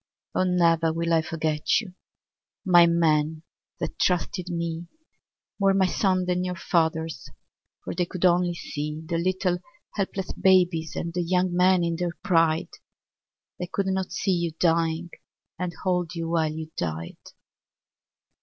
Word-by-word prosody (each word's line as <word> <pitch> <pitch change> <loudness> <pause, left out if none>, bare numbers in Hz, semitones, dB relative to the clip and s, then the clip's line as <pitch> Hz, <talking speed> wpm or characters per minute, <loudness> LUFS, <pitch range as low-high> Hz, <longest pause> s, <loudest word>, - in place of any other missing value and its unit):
Oh, 185 - +2
never 165 -2 +3
will 165 +1 -1
I 165 - +4
forget 155 -1 0
you, 195 -5 -8 0.7
My 175 -2 +7
men 160 -2 +2 0.4
that - - -4
trusted 180 +1 0
me. 170 0 -3 0.7
More 195 -1 +3
my 190 -1 +4
sons 185 0 +1
than 180 0 0
your 180 0 -2
fathers'. 160 -2 -1 0.5
For - - -4
they 175 0 -1
could 185 +1 -2
only 175 0 +3
see 150 -1 -5
The 165 0 -1
little 180 0 0 0.3
helpless 195 -2 -3
babies 180 -4 +3
And 170 0 -3
the 175 - -1
young 180 +1 +1
men 180 0 +4
in 170 -1 -1
their 175 -1 -3
pride. 165 -4 +2 0.9
They 180 - -3
could 195 +2 -2
not 190 -1 -1
see 195 - 0
you 170 -2 -1
dying. 165 0 +1 0.5
And 180 -1 -2
hold 180 -2 0
you 165 -1 -3
while 160 -2 +1
you 160 0 -7
died. 80 0 -4
170 Hz, 145 wpm, -25 LUFS, 165-180 Hz, 0.9 s, My